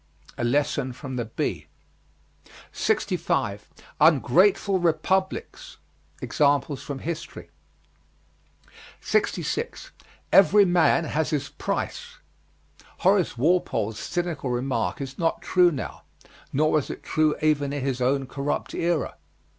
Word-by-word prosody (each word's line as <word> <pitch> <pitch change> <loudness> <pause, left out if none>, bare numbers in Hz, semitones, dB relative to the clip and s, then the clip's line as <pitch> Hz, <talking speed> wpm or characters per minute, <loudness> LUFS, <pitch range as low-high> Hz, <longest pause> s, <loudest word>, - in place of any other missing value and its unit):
A - - -4
lesson 130 0 0
from 130 0 -7
the 120 -2 -2
bee. 110 - -3 1.0
65. - - -1 0.3
UNGRATEFUL 170 - +4
REPUBLICS. 190 - -1 0.5
Examples 145 -1 +1
from 140 - -6
history. 165 +4 -6 1.5
66. 455 +3 -2 0.4
"EVERY 200 +1 +6
MAN 170 -2 +3
HAS 160 0 -1
HIS 145 -3 -2
PRICE." - - -4 0.8
Horace 190 -7 +2
Walpole's 120 - +1
cynical 170 -6 -3
remark 120 -6 -1
is 135 0 -7
not 165 -1 0
true 180 -1 +4
now, 145 -7 -6 0.5
nor 155 +3 +2
was 150 -3 +1
it - - -7
true 155 -1 +1
even 145 -2 +1
in 145 -2 -3
his 130 -2 -2
own 135 +2 +1
corrupt 140 +2 -3
era. 170 - -1
150 Hz, 105 wpm, -25 LUFS, 135-175 Hz, 1.5 s, EVERY